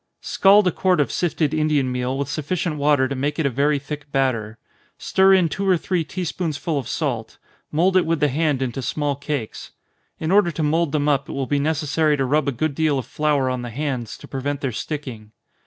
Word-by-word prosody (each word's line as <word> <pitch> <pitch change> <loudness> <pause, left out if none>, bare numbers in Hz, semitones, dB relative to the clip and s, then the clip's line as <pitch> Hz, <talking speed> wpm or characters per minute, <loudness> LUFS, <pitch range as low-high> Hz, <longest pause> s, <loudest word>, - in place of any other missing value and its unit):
_ - - -16
Scald 200 +1 +5
a 180 - +3
quart 185 +1 +1
of 145 - +1
sifted 160 -3 0
Indian 150 -4 +1
meal 125 +1 -2
with 140 -1 -2
sufficient 155 +2 -2
water 145 -2 +3
to 140 - -3
make 145 +2 -2
it 160 - 0
a 140 - +1
very 145 +4 +2
thick 145 +1 -7
batter. 115 -5 0 0.4
Stir 190 0 +4
in 180 -3 +3
two 195 +6 -2
or 185 - +5
three 175 0 -1
tea 185 +3 -5
spoonsful 160 -2 -2
of 125 - -6
salt 125 -7 -3 0.3
mould 180 +5 +2
it 185 -3 +3
with 165 -1 +1
the 150 - +3
hand 145 -1 0
into 130 +1 -3
small 145 +2 -1
cakes. 140 -5 -5 0.5
In 160 +2 -2
order 200 -3 +5
to 160 - -2
mould 160 +1 +1
them 150 -1 0
up, 140 -2 +1
it - - -5
will 135 -1 -2
be 145 +2 0
necessary 155 0 +1
to 135 - 0
rub 145 +2 +1
a - - +2
good 150 +4 -1
deal 155 -1 +1
of 130 - -3
flour 150 -3 0
on 130 -1 -2
the 120 - -5
hands, 125 -2 -4
to - - -13
prevent 140 +2 -3
their 135 - -1
sticking. 120 -5 -6
145 Hz, 225 wpm, -22 LUFS, 135-160 Hz, 0.5 s, Scald